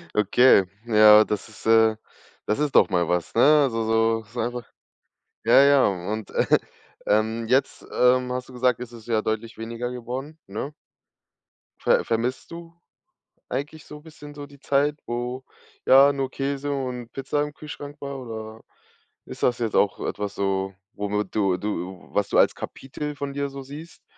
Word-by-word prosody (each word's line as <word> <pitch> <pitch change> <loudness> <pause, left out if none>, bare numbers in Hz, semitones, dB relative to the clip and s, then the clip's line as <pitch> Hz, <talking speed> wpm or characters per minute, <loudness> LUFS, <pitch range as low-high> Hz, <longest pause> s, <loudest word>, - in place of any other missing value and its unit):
Okay, 105 0 +5 0.2
ja, 110 -1 +7
das 105 +1 -4
ist, 110 - -15
äh 110 -1 +5 0.5
das 105 - 0
ist 150 -2 -1
doch - - +6
mal 85 -2 +1
was, 90 -1 -1
ne? 115 - +4 0.2
Also, 115 -4 -1
so 115 0 +1
so 115 +4 -9
einfach 120 0 -3 0.8
Ja, - - +7
ja, 140 -1 +5
und, 100 +3 -4
äh, - - +1 0.6
ähm, 110 +2 +1
jetzt, 130 +3 0
ähm, 125 0 +3
hast 125 0 -5
du 130 - -12
gesagt, 125 -1 +1
ist 120 -1 -8
es 115 -2 -12
ja 110 -2 +1
deutlich 110 +1 -3
weniger 115 +2 -5
geworden, 130 +6 -6
ne? 115 +9 -5 1.1
Ver - - +2
vermisst 120 +6 -2
du 170 0 -10 0.8
eigentlich 150 +3 -5
so 150 - -10
bisschen 150 -2 -12
so 145 -1 -7
die 140 0 -17
Zeit, 145 +1 +1
wo, 120 +2 -4 0.4
ja, 140 +2 +7
nur 135 -1 -2
Käse 140 +1 -3
und 125 -4 -4
Pizza 135 +2 -2
im 150 0 -6
Kühlschrank 145 -1 -9
war, 140 -1 -6
oder 110 -2 -8 0.6
ist - - -9
das 120 -1 +2
jetzt 115 -3 -2
auch 100 - +2
etwas 105 0 -4
so, 95 0 -1 0.2
womit 105 -1 -3
du 95 -4 +2
du 95 -2 -5
was 100 -1 0
du - - +1
als - - +4
Kapitel 150 +2 -6
von 140 0 -5
dir 140 0 -2
so 140 0 -8
siehst, 150 +5 -11
120 Hz, 170 wpm, -24 LUFS, 110-140 Hz, 1.1 s, ja